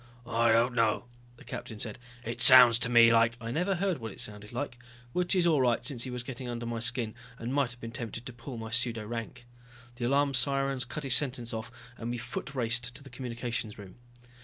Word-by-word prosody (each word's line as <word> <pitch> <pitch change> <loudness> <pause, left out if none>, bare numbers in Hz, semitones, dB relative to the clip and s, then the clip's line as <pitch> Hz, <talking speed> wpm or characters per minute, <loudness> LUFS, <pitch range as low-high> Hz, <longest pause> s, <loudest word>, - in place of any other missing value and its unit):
"I 115 0 +2
don't 115 +2 +3
know," 115 0 +1 0.3
the - - -15
captain 110 - -7
said, 110 0 -5 0.3
"it 115 +1 -4
sounds 125 -3 +9
to 120 - -1
me 115 -1 +7
like...." 115 0 +3
I 115 -1 -5
never 180 +8 0
heard 185 -3 -1
what 110 -2 -6
it - - -12
sounded 105 0 -5
like, 125 0 -5 0.3
which 180 +2 0
is 180 -2 +3
all 155 -5 +3
right 120 -1 +1
since 130 -4 -3
he - - -5
was 125 -1 -5
getting 125 0 -7
under 120 0 -4
my 115 0 -3
skin 115 -1 0 0.2
and 120 +2 -4
might 140 -3 +1
have 120 0 -13
been 115 -1 -7
tempted 115 0 -6
to 130 - -7
pull 120 +1 -9
my 110 0 -7
pseudo 115 -2 +1
rank. 120 +2 -6 0.5
The 120 - -2
alarm 140 +1 +2
sirens 135 0 0
cut 150 +5 -6
his 135 -2 +2
sentence 125 -4 +2
off 110 0 -5 0.3
and 115 - -4
we 120 - -2
foot 120 +3 -6
raced 120 0 0
to - - -8
the 135 - -13
communications 120 -3 -5
room. 100 -1 -12
120 Hz, 225 wpm, -29 LUFS, 115-130 Hz, 0.5 s, sounds